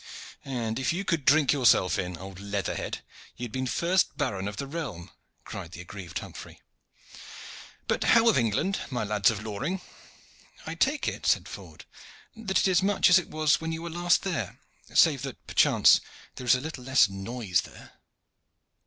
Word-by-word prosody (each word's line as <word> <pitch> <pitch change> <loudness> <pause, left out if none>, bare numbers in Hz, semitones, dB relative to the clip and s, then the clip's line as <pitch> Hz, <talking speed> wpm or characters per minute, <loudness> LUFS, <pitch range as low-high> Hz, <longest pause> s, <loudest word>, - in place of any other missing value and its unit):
"And 120 -3 -3
if 130 - 0
you 185 +4 -3
could 165 -7 -1
drink 145 -1 +5
yourself 115 - +3
in, 90 -2 -4
old 95 0 -10
leather 100 -1 -3
head, - - -5 0.3
you 125 - -7
had 120 - -5
been 130 +2 -2
first 170 +3 +1
baron 100 -10 -2
of 105 0 -6
the 140 - -3
realm," 135 - -6 0.3
cried 85 +1 -8
the 90 - -8
aggrieved 90 -1 -8
Humphrey. - - -9 1.3
"But - - 0
how 230 0 +5
of 230 - +5
England, 120 - +1
my 125 -5 -2
lads 105 -2 +2
of 110 -2 -4
Loring?" 135 - -3 0.9
"I 160 - -4
take 270 - 0
it," - - -3
said - - +2
Ford, - - -11 0.5
"that 215 -4 -1
it - - +3
is 180 -3 +3
much 195 -2 +3
as 180 - +8
it 175 - -8
was 155 0 +2
when 160 0 -3
you 160 +1 -5
were 170 - -5
there 170 - -6
last, 175 +2 +3 0.6
save - - +4
that - - -8
perchance - - +5 0.3
there 125 - -8
is 120 - +6
a 125 - -3
little 150 -4 -7
less 130 -4 +4
noise 95 -2 -2
there." - - -14
130 Hz, 180 wpm, -27 LUFS, 100-165 Hz, 1.3 s, as